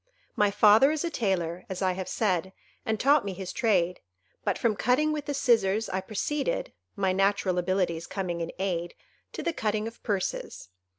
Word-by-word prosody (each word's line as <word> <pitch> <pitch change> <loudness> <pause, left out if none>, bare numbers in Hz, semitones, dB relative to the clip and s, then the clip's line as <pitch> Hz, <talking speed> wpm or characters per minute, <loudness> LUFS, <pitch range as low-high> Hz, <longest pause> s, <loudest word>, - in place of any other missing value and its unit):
My 205 -1 +3
father 210 +6 +6
is 310 -1 -1
a 340 - -2
tailor, 180 - -1
as 190 0 -3
I 185 - +3
have 185 0 -4
said, 190 -3 0 0.3
and 220 -1 0
taught 285 +1 +4
me 200 -1 -4
his 185 0 -6
trade; 180 -6 +1 0.4
but - - 0
from 225 -3 +1
cutting 255 +9 +2
with 300 -2 -3
the 285 - -2
scissors 225 -5 +2
I 190 - -1
proceeded—my 225 - -2
natural 195 -1 +1
abilities 175 -2 -1
coming 180 -3 -3
in 165 - -3
aid—to 175 -3 -5
the 340 - 0
cutting 215 -4 -1
of 230 - -10
purses. 195 - -3
200 Hz, 170 wpm, -28 LUFS, 185-230 Hz, 0.4 s, father